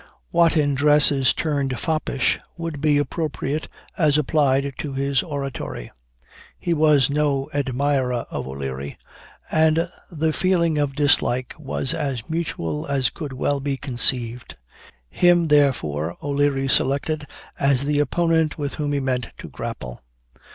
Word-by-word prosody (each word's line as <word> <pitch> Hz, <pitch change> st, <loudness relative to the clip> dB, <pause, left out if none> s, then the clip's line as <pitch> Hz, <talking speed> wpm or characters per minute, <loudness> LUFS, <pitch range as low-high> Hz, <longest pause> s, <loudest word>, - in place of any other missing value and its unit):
What 170 Hz, -1 st, +4 dB
in 145 Hz, -2 st, +2 dB
dress 150 Hz, +2 st, +5 dB
is 135 Hz, -2 st, +3 dB
termed 140 Hz, -5 st, -1 dB
foppish, 155 Hz, -4 st, 0 dB, 0.2 s
would 165 Hz, -4 st, -5 dB
be 150 Hz, -2 st, +3 dB
appropriate 150 Hz, 0 st, -2 dB, 0.3 s
as 150 Hz, -4 st, +3 dB
applied 140 Hz, -2 st, +2 dB
to 145 Hz, -3 st, -4 dB
his 135 Hz, 0 st, +1 dB
oratory. 140 Hz, -, -5 dB, 0.7 s
He 175 Hz, -, -1 dB
was 150 Hz, -3 st, +4 dB
no 145 Hz, -2 st, 0 dB
admirer 135 Hz, -2 st, 0 dB
of -, -, -4 dB
O'Leary, 70 Hz, 0 st, -5 dB, 0.5 s
and 160 Hz, +2 st, +3 dB, 0.2 s
the 160 Hz, -2 st, -1 dB
feeling 170 Hz, -4 st, +2 dB
of 140 Hz, -2 st, -1 dB
dislike 130 Hz, -3 st, +1 dB
was 135 Hz, -2 st, -2 dB
as 135 Hz, -6 st, -3 dB
mutual 85 Hz, -, -3 dB
as 135 Hz, -4 st, +1 dB
could 145 Hz, -5 st, -6 dB
well 140 Hz, +2 st, 0 dB
be 140 Hz, 0 st, -2 dB
conceived. 125 Hz, -, -1 dB, 0.5 s
Him, 175 Hz, -, +3 dB
therefore, 85 Hz, -, +2 dB
O'Leary 140 Hz, -1 st, +1 dB
selected 145 Hz, +3 st, 0 dB, 0.3 s
as 140 Hz, -1 st, +3 dB
the 145 Hz, 0 st, +1 dB
opponent 160 Hz, +1 st, +1 dB
with 145 Hz, -2 st, -3 dB
whom 145 Hz, -1 st, -1 dB
he 140 Hz, -, +1 dB
meant 130 Hz, -2 st, -2 dB
to -, -, -9 dB
grapple. 60 Hz, -1 st, -7 dB
140 Hz, 135 wpm, -22 LUFS, 130-155 Hz, 0.7 s, dress